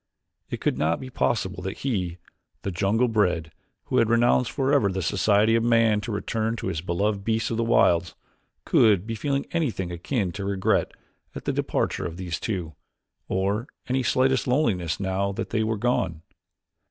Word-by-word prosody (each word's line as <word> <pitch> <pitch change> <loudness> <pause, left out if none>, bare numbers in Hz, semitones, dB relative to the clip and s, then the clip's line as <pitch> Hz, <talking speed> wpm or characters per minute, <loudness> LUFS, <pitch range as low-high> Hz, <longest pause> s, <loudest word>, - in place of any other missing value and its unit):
It - - -5
could - - 0
not 80 +2 +1
be 130 -1 -8
possible 95 -7 -1
that 95 +2 -5
he, 95 -10 -2 0.5
the 100 - -2
jungle 100 +7 +1
bred, 90 -8 +1 0.3
who - - -1
had 115 - +3
renounced 120 +1 +3
forever 135 -7 +2
the 95 -1 -2
society 105 +5 +3
of 115 0 +3
man 115 -3 +3
to 115 - -5
return 110 +2 -1
to - - -3
his 80 - -3
beloved 100 +4 -1
beasts 110 +2 0
of 115 - -1
the 115 - +1
wilds, 85 -7 +3 0.5
could 105 -4 +4
be 115 - -4
feeling 140 +5 -1
anything 120 - -1
akin 90 +3 -2
to 100 +2 -6
regret 100 +2 +1 0.4
at - - -7
the - - 0
departure - - -1
of 85 0 -8
these 90 -2 -4
two, 90 -7 -3 0.5
or 100 +6 -1 0.2
any 130 +1 +1
slightest 130 +2 +2
loneliness 110 - +1
now 100 +1 -1
that - - -5
they 110 -1 +1
were 110 0 -1
gone. 95 -8 -1
105 Hz, 175 wpm, -25 LUFS, 95-115 Hz, 0.5 s, could